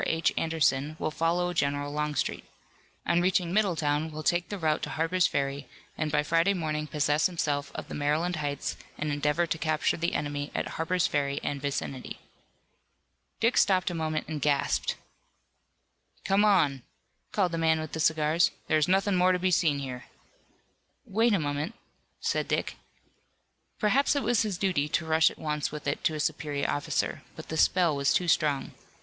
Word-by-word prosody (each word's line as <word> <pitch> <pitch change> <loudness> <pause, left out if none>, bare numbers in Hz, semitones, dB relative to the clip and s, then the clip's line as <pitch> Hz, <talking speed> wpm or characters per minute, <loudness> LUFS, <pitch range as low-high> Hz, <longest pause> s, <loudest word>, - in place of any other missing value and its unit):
H. 160 0 +1
Anderson 155 -2 +1
will 155 - -2
follow 175 +3 0
General 145 -2 -1
Longstreet. 150 -1 -2 0.6
On 170 0 +2
reaching 180 -1 +1
Middletown 160 -7 +1
will 155 0 -6
take 175 +2 +1
the 205 - -4
route 155 -4 0
to - - -4
Harper's 165 +3 +1
Ferry, 140 0 -2 0.3
and 155 -1 -2
by 150 0 +2
Friday 165 +6 +2
morning 155 -3 -2
possess 150 +1 +2
himself 145 -5 -2
of - - -6
the - - -8
Maryland 155 +4 0
Heights 145 -2 -3 0.2
and 150 0 -2
endeavor 150 +3 +1
to 165 - -2
capture 155 -2 +1
the 170 +1 -1
enemy 145 0 -2
at - - -2
Harper's 175 +2 0
Ferry 140 -1 0
and 140 -1 -3
vicinity. 135 -2 -4 1.2
Dick 230 +2 +2
stopped 185 -2 +3
a - - -4
moment 155 -2 -2
and 155 -2 -4
gasped. 140 0 +1 1.3
"Come 195 +1 +3
on," 160 -11 +3 0.5
called 185 -4 +1
the 165 - -2
man 160 -1 +3
with 155 -1 -5
the 160 - -5
cigars, 155 +1 +3 0.2
"there 155 - +2
is 155 - +2
nothing 195 +2 +2
more 185 0 +4
to - - +2
be 185 +1 0
seen 160 -4 +3
here." 125 -3 -6 1.0
"Wait 225 +4 +2
a 205 - +4
moment," 145 +7 -3 0.4
said - - -1
Dick. - - -1 1.0
Perhaps 260 +7 +2
it 285 - 0
was 235 0 +2
his 210 -5 -1
duty 175 -7 0
to 155 +3 0
rush 160 0 +4
at - - -12
once 150 -2 -2
with 150 -1 -7
it 140 - -2
to 155 - +2
a - - -4
superior 145 -1 -1
officer, 145 - -1
but - - -10
the 160 - -3
spell 175 -2 +3
was 140 0 +1
too 180 - +1
strong. 150 -4 +1
155 Hz, 175 wpm, -28 LUFS, 145-180 Hz, 1.3 s, more